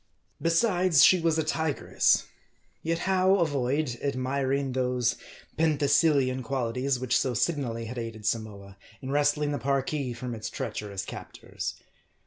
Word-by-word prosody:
Besides, 170 - +3
she 185 - +7
was 165 -1 +2
a 160 - +1
tigress. 155 -1 +1 0.6
Yet 165 +1 -1
how 190 0 +3
avoid 140 -6 0
admiring 135 0 -1
those 125 -1 0 0.4
Penthesilian 145 -4 +3
qualities 125 +1 -1
which 125 -1 0
so 130 -2 -1
signally 120 -3 -1
had 120 +2 -6
aided 115 -2 -7
Samoa, 105 -4 -3 0.3
in 130 - -4
wresting 145 +1 +2
the 145 - -2
Parki 140 0 -1
from 125 0 -5
its 110 -2 -5
treacherous 100 -2 -5
captors. - - -7
135 Hz, 125 wpm, -27 LUFS, 120-155 Hz, 0.6 s, she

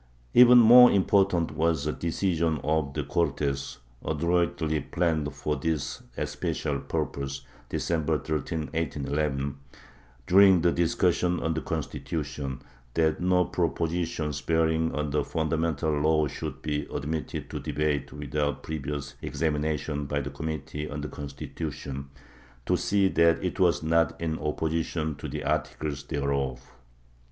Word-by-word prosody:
Even 125 0 +9
more 120 +1 +9
important 95 -3 +3
was 80 -1 0
a 75 - +1
decision 85 -1 0
of 75 -2 0
the 75 - -1
Cortes, 70 -4 -1 0.3
adroitly 85 0 0
planned 80 -4 0
for 75 +2 -2
this 80 -3 -2 0.2
especial 70 -1 -2
purpose, 70 0 -3 0.2
December 80 -2 0
13, 80 +1 -2
1811, 70 -2 -1 0.7
during 95 +1 +6
the 85 +1 +3
discussion 85 +1 +1
on 80 - 0
the 80 - -2
Constitution, 70 -5 -4 0.3
that 80 -1 +2
no 90 0 +3
propositions 80 -3 -1
bearing 80 +2 +1
on 75 -1 -2
the 75 - +1
fundamental 80 -1 -1
law 75 +1 +2
should 70 - -6
be 75 -1 -2
admitted 75 0 -3
to - - -4
debate 75 -1 -1
without 75 -1 -2
previous 70 -2 -4
examination 75 -2 -1
by 70 0 -1
the 70 0 -4
committee 75 0 -5
on 75 0 -5
the 75 - -5
Constitu 70 +3 -6
tion, 70 0 -7 0.6
to - - +2
see 100 -1 +2
that 85 -1 +3
it 90 +2 -2
was 90 -4 +3
not 80 0 +2
in 80 -1 -2
opposition 80 +1 -1
to - - -6
the - - -5
articles 75 -2 -2
thereof. 70 -3 -2
80 Hz, 130 wpm, -27 LUFS, 70-85 Hz, 0.7 s, Even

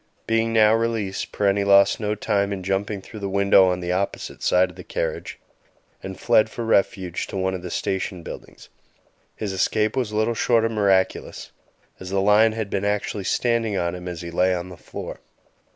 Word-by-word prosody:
Being 115 0 +1
now 110 -1 +5
released, 115 -4 -1
Parenti 100 0 +1
lost 100 0 +5
no 105 -1 -1
time 100 -2 0
in 95 -2 -4
jumping 95 +1 -2
through 110 - -10
the 100 -1 -3
window 100 -1 +5
on 90 0 -2
the 90 0 -2
opposite 95 +2 -3
side 90 0 +3
of - - -18
the - - -10
carriage, - - -4 0.6
and 95 -1 -8
fled 110 -2 +3
for 115 +2 -5
refuge 95 -4 0
to - - -6
one 95 0 0
of 95 - -4
the 90 - -6
station 95 -1 -3
buildings; - - -10 0.7
his 105 -3 -4
escape 105 +4 +1
was 125 -5 -1
little 110 +2 +1
short 115 0 +2
of 115 - -1
miraculous, 100 -3 0 0.5
as 95 - -8
the 95 0 0
lion 105 +3 +4
had 110 -3 -4
been 100 - -1
actually 105 -1 -2
standing 115 -3 0
on 85 -1 -1
him 90 0 -7
as 90 -2 -5
he 85 - -6
lay 90 +2 +2
on 90 +1 -5
the 90 - -10
floor. - - -8
100 Hz, 195 wpm, -23 LUFS, 95-110 Hz, 0.7 s, now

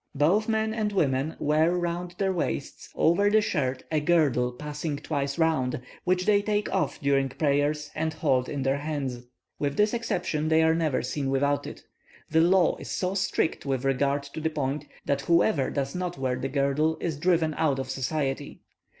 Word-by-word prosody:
Both 180 +11 +2
men 220 0 +1
and 215 -2 -1
women 145 -5 0
wear 155 +3 +2
round 175 0 -3
their 195 -1 +1
waists, 70 - -3
over 190 +5 +3
the 215 +1 +5
shirt, 135 -11 -1
a 155 - +2
girdle 150 -6 +2
passing 150 +3 -4
twice 140 -1 -3
round, 160 -7 +1 0.3
which 180 0 +1
they 205 -1 +4
take 210 0 -1
off 190 - 0
during 140 -1 +2
prayers 145 +1 0
and 160 +1 -1
hold 130 -5 0
in 140 -2 -3
their 135 +1 +1
hands; 140 -5 -3 0.4
with 140 -1 -1
this 210 +2 +3
exception, 165 -9 -1
they 160 0 +4
are 160 0 +4
never 160 -5 0
seen 135 +2 -2
without 140 +1 +1
it. - - -9 0.5
The 160 +1 +4
law 175 0 +4
is - - -9
so 185 0 -1
strict 195 -4 0
with 135 -2 -2
regard 140 +1 +1
to 140 +2 -8
the 160 - +1
point, 145 -1 -2 0.2
that 140 -1 0
whoever 170 -1 +2
does 140 -1 -2
not 180 -1 -3
wear 130 -2 -1
the 130 +2 -3
girdle 140 +3 +1
is 165 -3 -2
driven 165 -2 +2
out 150 -3 +1
of 130 0 -4
society. 135 +1 -3
150 Hz, 185 wpm, -27 LUFS, 140-175 Hz, 0.5 s, the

